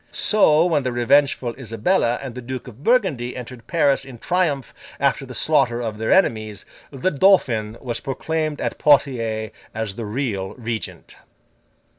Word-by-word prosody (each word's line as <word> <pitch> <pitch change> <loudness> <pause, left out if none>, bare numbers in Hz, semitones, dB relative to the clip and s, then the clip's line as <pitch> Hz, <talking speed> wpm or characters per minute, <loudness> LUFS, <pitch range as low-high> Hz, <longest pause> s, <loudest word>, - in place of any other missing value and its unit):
So, 165 -7 +3
when 160 -5 +2
the 130 -1 -2
revengeful 125 0 +2
Isabella 120 - 0
and 130 -3 -6
the 125 - -7
Duke 130 +2 -6
of 125 +3 -12
Burgundy 160 - +1
entered 125 -1 -9
Paris 145 -5 +2
in 130 -2 -11
triumph 155 - -1 0.3
after - - +1
the - - -8
slaughter 120 0 +2
of 110 -3 -4
their 110 - -1
enemies, 110 - +1 0.2
the 140 +7 -1
Dauphin 120 - +3
was 120 -3 -4
proclaimed 155 +3 -3
at - - -3
Poitiers 115 -7 +2 0.2
as 110 -3 -4
the 115 - -4
real 105 -5 -3
Regent. 115 -2 -6
125 Hz, 150 wpm, -22 LUFS, 115-145 Hz, 0.3 s, So